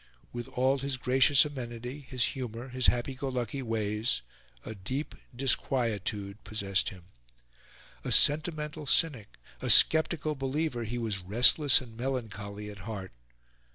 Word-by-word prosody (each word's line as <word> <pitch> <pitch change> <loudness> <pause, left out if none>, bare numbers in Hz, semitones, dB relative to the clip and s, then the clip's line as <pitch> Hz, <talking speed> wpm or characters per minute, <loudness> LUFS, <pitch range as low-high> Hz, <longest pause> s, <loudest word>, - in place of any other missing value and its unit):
With 120 +1 -5
all 130 +1 +1
his 135 0 -2
gracious 135 +3 +4
amenity, 125 -1 -6
his 130 -3 -2
humour, 125 -1 -6
his 125 0 +1
happy 125 +2 +1
go 135 +1 -4
lucky 125 +1 -3
ways, 110 - -1 0.4
a - - -6
deep 130 +9 -5 0.2
disquietude 110 -6 -1
possessed 100 -3 -1
him. 90 -3 -13 1.0
A - - -3
sentimental 150 0 +2
cynic, 135 -9 +1 0.2
a - - -3
sceptical 160 -1 +5
believer, 135 -2 -2
he 120 +3 -4
was 110 -5 -2
restless 125 - +5
and 115 -3 -12
melancholy 105 -5 -5
at 100 - -12
heart. 100 -3 -7
125 Hz, 130 wpm, -29 LUFS, 110-135 Hz, 1.0 s, sceptical